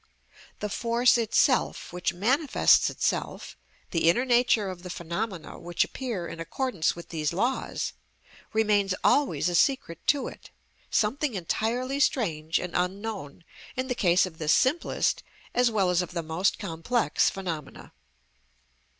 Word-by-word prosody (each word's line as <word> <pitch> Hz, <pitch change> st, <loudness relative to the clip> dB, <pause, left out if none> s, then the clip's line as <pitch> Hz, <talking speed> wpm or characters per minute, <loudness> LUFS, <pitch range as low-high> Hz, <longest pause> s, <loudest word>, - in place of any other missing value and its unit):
The 210 Hz, -, -2 dB
force 235 Hz, +3 st, +3 dB
itself 235 Hz, -, +1 dB
which 180 Hz, 0 st, -1 dB
manifests 260 Hz, -, +3 dB
itself, -, -, -2 dB, 0.4 s
the 165 Hz, -1 st, +3 dB
inner 245 Hz, +9 st, +2 dB
nature 240 Hz, -4 st, +3 dB
of 180 Hz, -1 st, -10 dB
the 180 Hz, -, -8 dB
phenomena 170 Hz, +1 st, -5 dB
which 175 Hz, 0 st, 0 dB
appear 235 Hz, -10 st, -4 dB
in 165 Hz, -, -8 dB
accordance 170 Hz, -, -1 dB
with 170 Hz, -, -10 dB
these 155 Hz, -3 st, -1 dB
laws, 240 Hz, +9 st, -1 dB, 0.6 s
remains 210 Hz, -3 st, +2 dB
always 285 Hz, -9 st, +3 dB
a 175 Hz, -, -1 dB
secret 170 Hz, -, +1 dB
to 285 Hz, -2 st, +2 dB
it, -, -, -11 dB, 0.4 s
something 250 Hz, +4 st, 0 dB
entirely 235 Hz, -, -1 dB
strange 165 Hz, -, +1 dB
and 180 Hz, -2 st, -4 dB
unknown 185 Hz, -4 st, -3 dB, 0.3 s
in 260 Hz, 0 st, -3 dB
the -, -, +1 dB
case 180 Hz, -6 st, +3 dB
of 165 Hz, -3 st, -10 dB
the 155 Hz, -, -4 dB
simplest 260 Hz, -, +2 dB, 0.3 s
as 245 Hz, 0 st, +3 dB
well 195 Hz, -5 st, +1 dB
as 180 Hz, 0 st, +2 dB
of 180 Hz, 0 st, -6 dB
the 170 Hz, -2 st, -2 dB
most 160 Hz, +5 st, 0 dB
complex 165 Hz, +2 st, 0 dB
phenomena. 165 Hz, -7 st, -6 dB
195 Hz, 140 wpm, -27 LUFS, 170-245 Hz, 0.6 s, force